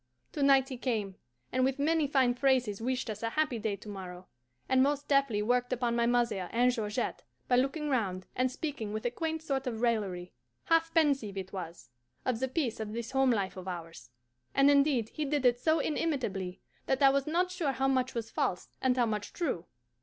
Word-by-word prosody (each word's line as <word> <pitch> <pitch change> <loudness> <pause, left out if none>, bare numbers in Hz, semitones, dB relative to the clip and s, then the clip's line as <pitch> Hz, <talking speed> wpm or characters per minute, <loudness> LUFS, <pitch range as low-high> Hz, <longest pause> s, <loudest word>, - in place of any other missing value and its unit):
To 295 - -4
night 275 -1 +5
he 260 - -5
came, 220 -6 -2 0.4
and 255 +1 +1
with 265 +1 +1
many 310 +1 +2
fine 265 -3 +3
phrases 250 -5 +1
wished 255 +2 -1
us 215 -2 -5
a 230 - -1
happy 300 -3 0
day 210 -1 -1
to 200 - -14
morrow, 185 -3 -7 0.4
and 260 0 +4
most 285 +1 +1
deftly 275 -7 +2
worked 245 +2 +1
upon 240 -1 0
my 235 0 +2
mother 235 -7 +1
and 245 +2 +3
Georgette 215 -4 -2 0.3
by 245 - +3
looking 275 +4 0
round 195 -9 -1
and 255 0 +1
speaking 255 -7 -4
with 215 +2 -4
a 240 - +1
quaint 320 +4 -3
sort 270 -3 -2
of 225 -3 -3
raillery 195 -7 -1 0.3
half 330 0 +2
pensive, 275 -11 +2
it 190 0 -6
was 170 -9 -7 0.3
of 250 -3 0
the 260 - 0
peace 260 -5 -2
of 215 -1 -4
this 235 +1 -4
home 265 0 +3
life 200 -6 0
of 185 0 -8
ours; 165 -8 -7 0.5
and 275 +1 +6
indeed, 280 -6 +3
he 310 - -4
did 290 -2 0
it 245 -1 +4
so 315 +5 +3
inimitably 225 - -2 0.3
that 265 +1 +1
I 270 - +8
was 275 +1 0
not 355 +3 +1
sure 320 -6 -1
how 265 +1 0
much 260 -1 +1
was 230 -1 -4
false 180 - -1
and 260 -1 +2
how 245 - +4
much 210 -2 -3
true. 255 - -2
250 Hz, 205 wpm, -31 LUFS, 210-275 Hz, 0.5 s, I